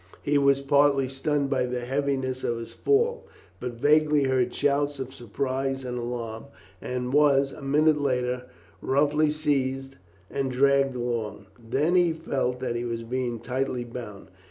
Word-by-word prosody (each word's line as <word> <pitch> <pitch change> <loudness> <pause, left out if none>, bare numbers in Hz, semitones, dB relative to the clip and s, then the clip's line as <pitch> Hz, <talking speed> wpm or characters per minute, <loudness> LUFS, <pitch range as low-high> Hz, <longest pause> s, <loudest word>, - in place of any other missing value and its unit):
He 145 0 +2
was 140 -1 +3
partly 140 -1 +3
stunned 140 +1 -1
by 130 -2 +1
the 125 0 -3
heaviness 130 0 -1
of 120 - 0
his 115 0 -8
fall, 465 +3 +1 0.3
but 125 -1 -4
vaguely 150 +3 +3
heard 130 -2 +1
shouts 145 +1 0
of 130 0 -5
surprise 135 +3 -3
and 125 -1 -4
alarm, 120 -1 -5 0.4
and 125 0 -3
was, 140 -2 +4
a - - -11
minute 150 +2 +3
later, 125 -2 -1 0.4
roughly 150 +3 +2
seized 135 -3 -1 0.3
and 135 +3 -2
dragged 135 +1 +3
along. 120 -4 -3
Then 135 +9 0
he 175 -2 +4
felt 135 -6 -2
that 120 -2 -2
he 120 - -2
was 115 -1 -3
being 120 -1 -3
tightly 125 +1 -2
bound. 115 -5 -9
135 Hz, 155 wpm, -26 LUFS, 125-145 Hz, 0.4 s, was